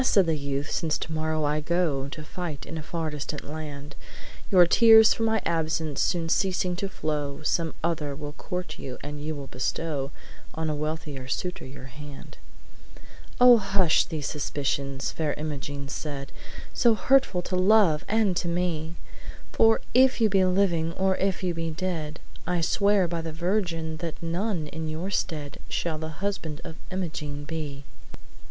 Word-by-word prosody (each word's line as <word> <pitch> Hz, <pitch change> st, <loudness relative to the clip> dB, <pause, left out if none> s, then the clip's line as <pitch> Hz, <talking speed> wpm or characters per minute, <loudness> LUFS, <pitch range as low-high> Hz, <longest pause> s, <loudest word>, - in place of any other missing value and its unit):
said 195 Hz, -7 st, +4 dB
the 165 Hz, -1 st, +1 dB
youth, 140 Hz, 0 st, -3 dB
'since 155 Hz, -2 st, 0 dB
tomorrow 155 Hz, 0 st, -1 dB
I 150 Hz, +1 st, +1 dB
go 155 Hz, -4 st, 0 dB
To 155 Hz, +2 st, -7 dB
fight 165 Hz, -3 st, -5 dB
in 160 Hz, -, -7 dB
a 160 Hz, -, -3 dB
far 160 Hz, 0 st, -3 dB
distant 150 Hz, 0 st, -5 dB
land, 145 Hz, -1 st, -7 dB, 0.5 s
Your 180 Hz, -3 st, +7 dB
tears 220 Hz, +4 st, +7 dB
for -, -, -6 dB
my 220 Hz, -1 st, +2 dB
absence 160 Hz, -2 st, 0 dB
soon 170 Hz, -2 st, +1 dB
ceasing 180 Hz, +1 st, +1 dB
to 195 Hz, 0 st, -2 dB
flow, 150 Hz, -4 st, -3 dB
Some 165 Hz, +1 st, 0 dB
other 155 Hz, -4 st, -1 dB
will 145 Hz, 0 st, -6 dB
court 180 Hz, +4 st, -5 dB
you, 130 Hz, -2 st, -6 dB
and 145 Hz, 0 st, -6 dB
you 155 Hz, +1 st, -3 dB
will 140 Hz, -1 st, -6 dB
bestow 135 Hz, +2 st, -2 dB, 0.5 s
On 160 Hz, -1 st, -1 dB
a -, -, -1 dB
wealthier 150 Hz, -3 st, -4 dB
suitor 180 Hz, +4 st, -3 dB
your 135 Hz, -1 st, -10 dB
hand.' 145 Hz, +2 st, -11 dB, 1.0 s
'Oh, 245 Hz, -1 st, +9 dB
hush 195 Hz, -5 st, +3 dB
these 155 Hz, -4 st, -4 dB
suspicions!' 140 Hz, -2 st, -2 dB
Fair 155 Hz, -3 st, -1 dB
Imogene 145 Hz, -2 st, -4 dB
said, 140 Hz, -1 st, -5 dB, 0.4 s
"So 235 Hz, -2 st, +4 dB
hurtful 255 Hz, -7 st, +3 dB
to 185 Hz, -, -2 dB
love 185 Hz, -4 st, +5 dB
and 215 Hz, -4 st, +2 dB
to 175 Hz, -, -1 dB
me! 170 Hz, -2 st, -1 dB, 0.6 s
For 225 Hz, 0 st, +5 dB
if 260 Hz, +1 st, +5 dB
you 220 Hz, -2 st, +4 dB
be 195 Hz, -1 st, +4 dB
living, 180 Hz, -3 st, +2 dB
or 190 Hz, +1 st, +2 dB
if 195 Hz, 0 st, 0 dB
you 180 Hz, -1 st, +1 dB
be 165 Hz, 0 st, -2 dB
dead, 160 Hz, -2 st, -3 dB, 0.3 s
I 180 Hz, -1 st, +1 dB
swear 200 Hz, +2 st, +3 dB
by 170 Hz, 0 st, -2 dB
the 160 Hz, 0 st, -5 dB
Virgin 170 Hz, -2 st, -1 dB
that 165 Hz, -1 st, -4 dB
none 175 Hz, 0 st, -1 dB
in 160 Hz, +1 st, -5 dB
your 165 Hz, +5 st, -3 dB
stead 150 Hz, -6 st, -2 dB
Shall 160 Hz, -2 st, -1 dB
the 160 Hz, +3 st, -6 dB
husband 160 Hz, -7 st, -3 dB
of 160 Hz, -, -8 dB
Imogene 150 Hz, -6 st, -4 dB
be!' 145 Hz, -3 st, -5 dB
160 Hz, 165 wpm, -27 LUFS, 150-185 Hz, 1.0 s, Oh